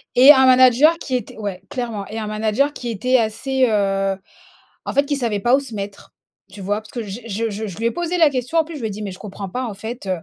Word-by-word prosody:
Et 265 Hz, +4 st, +9 dB
un 265 Hz, -2 st, +6 dB
manager 260 Hz, +5 st, +6 dB
qui 260 Hz, -, -3 dB
était 235 Hz, -2 st, -4 dB
ouais 200 Hz, -4 st, -5 dB
clairement. 230 Hz, -6 st, -4 dB
Et 220 Hz, +1 st, -5 dB
un 215 Hz, -, -4 dB
manager 215 Hz, +7 st, 0 dB
qui 240 Hz, -, -6 dB
était 255 Hz, +4 st, +1 dB
assez, 255 Hz, +4 st, 0 dB
heu, 195 Hz, -2 st, +1 dB, 0.7 s
en -, -, -4 dB
fait, 280 Hz, +1 st, +3 dB
qui 290 Hz, 0 st, -1 dB
savait 225 Hz, -6 st, -1 dB
pas 240 Hz, +5 st, +3 dB
où -, -, -1 dB
se 250 Hz, -5 st, -9 dB
mettre, 200 Hz, 0 st, -7 dB, 0.4 s
tu 200 Hz, +1 st, -11 dB
vois? 205 Hz, +2 st, -1 dB
Parce 215 Hz, -, -16 dB
que 235 Hz, -, -4 dB
j'ai 215 Hz, +3 st, -8 dB
je 225 Hz, +2 st, -2 dB
je 215 Hz, +2 st, -4 dB
je 185 Hz, -, -8 dB
lui 230 Hz, -, -1 dB
ai -, -, +3 dB
posé 345 Hz, +3 st, -2 dB
la 315 Hz, -3 st, +5 dB
question, 255 Hz, +5 st, -1 dB
en 320 Hz, -, +4 dB
plus. 325 Hz, -1 st, -9 dB
Je -, -, -8 dB
lui 225 Hz, -, -2 dB
ai -, -, -6 dB
dit: 210 Hz, +2 st, -6 dB
«Mais 200 Hz, -, -4 dB
je 185 Hz, -, -10 dB
comprends 195 Hz, -2 st, -7 dB
pas 255 Hz, +7 st, -3 dB
en 220 Hz, -4 st, -5 dB
fait». 220 Hz, 0 st, -7 dB
230 Hz, 275 wpm, -20 LUFS, 205-260 Hz, 0.7 s, Et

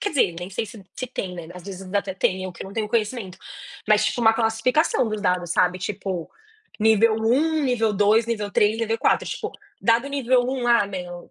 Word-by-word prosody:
quer 410 Hz, -, -1 dB
dizer, 255 Hz, -, +2 dB
nem 175 Hz, +1 st, -6 dB
sei 195 Hz, -, -2 dB
se 215 Hz, -1 st, -12 dB
se 255 Hz, -, -4 dB
tem, 190 Hz, -7 st, -5 dB
né, 170 Hz, -2 st, -8 dB
ás 180 Hz, -, -10 dB
vezes 195 Hz, 0 st, -8 dB
até 200 Hz, -2 st, -1 dB
tem, 185 Hz, 0 st, 0 dB
eu 185 Hz, -, -5 dB
que -, -, -8 dB
não 195 Hz, -, -9 dB
tenho 215 Hz, 0 st, -2 dB
o -, -, -13 dB
conhecimento. 210 Hz, -4 st, -2 dB, 0.5 s
Mas, 210 Hz, -1 st, +4 dB
tipo, 245 Hz, -, 0 dB
uma 225 Hz, -1 st, +6 dB
classificação 230 Hz, +4 st, +1 dB
dos 215 Hz, -1 st, -3 dB
dados, 180 Hz, -3 st, 0 dB
sabe, 180 Hz, 0 st, +2 dB
tipo, 185 Hz, -3 st, -4 dB, 0.5 s
nível 220 Hz, +1 st, +4 dB
1, 290 Hz, +8 st, +2 dB
nível 230 Hz, -5 st, +1 dB
2, 210 Hz, +3 st, +3 dB
nível 210 Hz, -3 st, -2 dB
3, 210 Hz, +2 st, +2 dB
nível 225 Hz, 0 st, -1 dB
4. -, -, +2 dB
Tipo, -, -, -4 dB, 0.3 s
dado 235 Hz, +4 st, +2 dB
nível 260 Hz, -3 st, +2 dB
1, 260 Hz, -2 st, -2 dB
ah, 235 Hz, -4 st, +4 dB
meu, 180 Hz, -3 st, -7 dB
215 Hz, 210 wpm, -23 LUFS, 190-235 Hz, 0.5 s, uma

